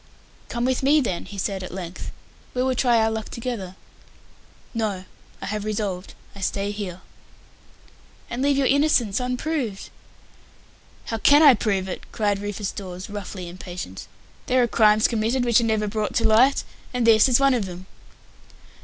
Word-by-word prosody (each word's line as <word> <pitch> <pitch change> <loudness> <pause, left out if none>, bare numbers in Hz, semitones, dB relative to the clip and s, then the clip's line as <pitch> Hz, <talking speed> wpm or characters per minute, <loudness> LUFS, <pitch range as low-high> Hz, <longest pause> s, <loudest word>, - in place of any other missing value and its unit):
"Come 240 0 -2
with 260 +1 +1
me 285 +3 +4
then," 205 -11 -2
he 205 - -10
said, 195 0 -2
at 185 - -7
length. 180 -1 -7 0.4
"We 250 - +1
will 260 0 +1
try 245 -2 +3
our 220 0 +2
luck 220 -1 -4
together." 225 -6 -5 1.0
"No. 210 -5 -2 0.4
I - - -3
have 210 0 -3
resolved. 205 -3 -3 0.2
I 200 - -10
stay 200 +1 -1
here." 190 -4 -6 1.3
"And 240 - -4
leave 280 0 +2
your 275 - +2
innocence 270 -7 +3
unproved." 250 -3 -3 1.1
"How 225 - -3
can 290 +7 +6
I 285 -3 +9
prove 200 -4 -1
it?" 185 - -7
cried 205 -3 0
Rufus 205 0 -4
Dawes, 185 0 -8
roughly 195 -3 -6
impatient. 175 - -8 0.4
"There 255 0 +3
are - - +2
crimes 215 -1 +4
committed 235 +3 0
which 235 0 +4
are - - 0
never 215 -2 0
brought 210 0 -2
to 230 - +2
light, 245 +6 +4 0.3
and 245 -2 +1
this 225 +2 +6
is 245 - +5
one 275 -1 +4
of 225 -6 -1
them." 180 0 -9
215 Hz, 165 wpm, -23 LUFS, 195-250 Hz, 1.3 s, I